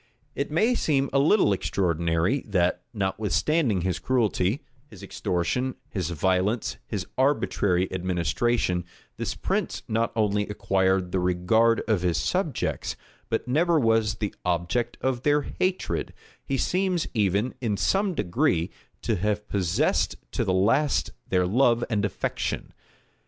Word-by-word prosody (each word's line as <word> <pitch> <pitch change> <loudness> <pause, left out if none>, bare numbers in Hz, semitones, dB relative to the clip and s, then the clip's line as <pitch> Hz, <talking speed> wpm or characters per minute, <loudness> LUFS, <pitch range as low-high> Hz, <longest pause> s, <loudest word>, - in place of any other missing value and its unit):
It 140 - -2
may 215 +11 +2
seem 140 - +1
a 135 - +4
little 150 - +4
extraordinary, 85 - 0
that, 90 -3 +1
notwithstanding 105 - 0
his 90 +1 -1
cruelty, 115 - +1 0.2
his 105 -9 -13
extortion, 125 +9 -1
his 90 -5 -2
violence, 95 +6 0
his 100 -6 -3
arbitrary 100 -9 +2
administration, 90 +2 0 0.3
this - - -3
prince - - -2
not 115 +1 0
only 105 -2 +1
acquired 95 -2 +1
the 95 - +1
regard 90 +6 +3
of 105 -5 +2
his 90 -3 +1
subjects, - - -1 0.3
but 115 - -1
never 160 +5 +3
was 115 -3 +2
the 105 -2 -3
object 90 +8 -1
of 130 -2 0
their 145 +1 +2
hatred: 185 +5 -2 0.3
he 135 - -2
seems 180 +2 0
even, 105 +2 +1
in 110 -5 0
some 195 - +1
degree, 90 - +1 0.3
to 110 - 0
have 105 +2 -1
possessed 90 -4 +1 0.2
to - - -1
the - - 0
last 100 - +2 0.2
their 90 -1 +2
love 120 +4 +3
and 105 -2 +1
affection. 100 - -3
105 Hz, 130 wpm, -26 LUFS, 90-130 Hz, 0.3 s, a